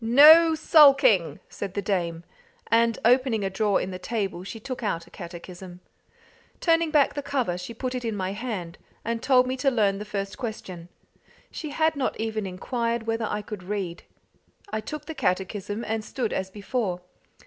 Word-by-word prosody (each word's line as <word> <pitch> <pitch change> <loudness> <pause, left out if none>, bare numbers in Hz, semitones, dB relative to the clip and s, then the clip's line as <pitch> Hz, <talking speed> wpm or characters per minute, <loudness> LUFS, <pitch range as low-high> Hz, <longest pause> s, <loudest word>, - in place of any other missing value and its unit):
"No 310 +7 +8
sulking!" 275 - +5
said 195 -2 -7
the 200 - 0
dame; 175 -4 -1 0.5
and 230 0 +3
opening 245 -3 +3
a 195 - -1
drawer 205 +1 +1
in 190 - -4
the 185 - -6
table, 195 -3 -3
she 225 +4 -7
took 255 +3 -6
out 170 -7 -2
a 170 - -20
catechism. 175 +1 -9 0.8
Turning 330 -1 +2
back 300 -3 +3
the 290 - -3
cover 270 -10 -1
she 180 +6 -7
put 255 +2 -3
it 250 -1 -4
in 225 -2 -2
my 190 -1 -2
hand, 200 -6 -5 0.3
and 230 0 -2
told 255 -1 +4
me 255 +1 -2
to 275 +1 +2
learn 205 -6 +1
the - - -4
first 200 -2 -5
question. 185 -7 -6 0.6
She 310 - -6
had 315 +2 +1
not 275 -2 -2
even 220 -2 -2
inquired 230 +5 -2
whether 225 -1 -1
I 210 - -3
could 210 -2 -7
read. 185 -2 -4 0.7
I 215 - -1
took 300 +7 -7
the 320 - -6
catechism, 205 - -2
and 220 0 -2
stood 235 +1 -3
as 190 0 -2
before. 200 -2 -3
220 Hz, 180 wpm, -25 LUFS, 190-255 Hz, 0.8 s, No